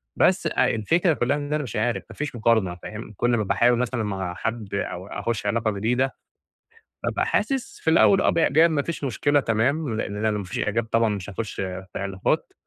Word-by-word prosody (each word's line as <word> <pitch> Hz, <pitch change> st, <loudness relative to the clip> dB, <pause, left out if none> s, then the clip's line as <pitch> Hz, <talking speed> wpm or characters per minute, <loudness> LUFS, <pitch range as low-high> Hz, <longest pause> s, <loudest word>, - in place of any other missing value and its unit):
بس -, -, +3 dB
الفكرة 165 Hz, -, +2 dB
كلّها 140 Hz, +1 st, 0 dB
إن 145 Hz, 0 st, -4 dB
أنا 150 Hz, 0 st, 0 dB
مش 125 Hz, -, -7 dB
عارف، 120 Hz, -1 st, 0 dB
ما -, -, -11 dB
فيش 150 Hz, -4 st, -4 dB
مُقارنة 110 Hz, -6 st, +2 dB
فاهم. 105 Hz, +4 st, -8 dB
كل 120 Hz, -, +1 dB
ما 105 Hz, -, 0 dB
باحاول 120 Hz, +4 st, +3 dB
مثلًا 125 Hz, -1 st, -1 dB
مع 95 Hz, -4 st, -3 dB
حد، 110 Hz, -2 st, -4 dB
أو 95 Hz, -2 st, -3 dB
أخُش 105 Hz, +1 st, -3 dB
علاقة 110 Hz, +1 st, +1 dB
جديدة، 125 Hz, +6 st, 0 dB, 0.9 s
بابقى -, -, 0 dB
حاسس 270 Hz, -3 st, -1 dB
في 160 Hz, -, +1 dB
الأول 190 Hz, +4 st, +5 dB
آه -, -, +3 dB
بإعجاب 165 Hz, 0 st, +4 dB
ما 150 Hz, -3 st, +1 dB
فيش 160 Hz, -1 st, -4 dB
مشكلة 145 Hz, +3 st, +2 dB
تمام، 125 Hz, +3 st, 0 dB
لإن 105 Hz, -1 st, -3 dB
لو 110 Hz, -1 st, +1 dB
ما 100 Hz, -, -4 dB
فيش 90 Hz, -, -5 dB
إعجاب 115 Hz, +3 st, 0 dB
طبعًا، 115 Hz, 0 st, +2 dB
مش 105 Hz, -2 st, -4 dB
هاخُش 110 Hz, +2 st, -5 dB
في 95 Hz, 0 st, -5 dB
علاقات. 95 Hz, -1 st, -1 dB
115 Hz, 195 wpm, -24 LUFS, 105-140 Hz, 0.9 s, الأول